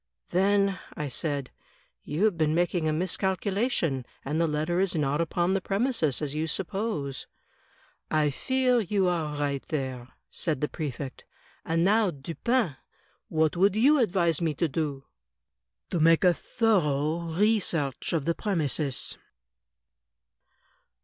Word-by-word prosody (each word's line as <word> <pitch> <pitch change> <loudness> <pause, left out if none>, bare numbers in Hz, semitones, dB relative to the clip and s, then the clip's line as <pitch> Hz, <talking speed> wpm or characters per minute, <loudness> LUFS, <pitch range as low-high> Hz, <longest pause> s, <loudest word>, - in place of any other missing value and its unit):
"Then," 195 +1 +2 0.2
I 150 -2 -3
said, 140 0 -2 0.5
"you 160 +8 0
have 210 -5 +2
been 155 -1 +1
making 175 -2 +1
a - - +1
miscalculation, 185 - 0 0.2
and 150 +4 0
the 165 - +3
letter 155 +3 0
is 190 -1 +1
not 145 0 +1
upon 175 +2 0
the 195 - +1
premises, 195 - 0
as 145 -1 -1
you 155 +1 -1
suppose." 165 - -2 0.4
" - - -34
I 150 -2 +2
fear 255 - +1
you 200 -2 +1
are 160 -4 -1
right 140 -2 -1
there," 130 -5 -3 0.2
said 155 -6 -1
the 150 - 0
Prefect. 140 -4 -6 0.4
"And 165 +1 +1
now, 210 +2 +4
Dupin, 170 - -1 0.5
what 160 0 +1
would 195 +3 +3
you 280 +7 +5
advise 175 - +2
me 160 -3 0
to 170 - +1
do?" 145 -2 -3 0.9
"To 175 - 0
make 165 +2 +5
a 180 -1 +6
thorough 160 -8 +1
re 210 +6 +3
search 145 -8 -2
of 160 -5 0
the 170 - +2
premises." 155 - -2
165 Hz, 140 wpm, -27 LUFS, 150-195 Hz, 0.9 s, a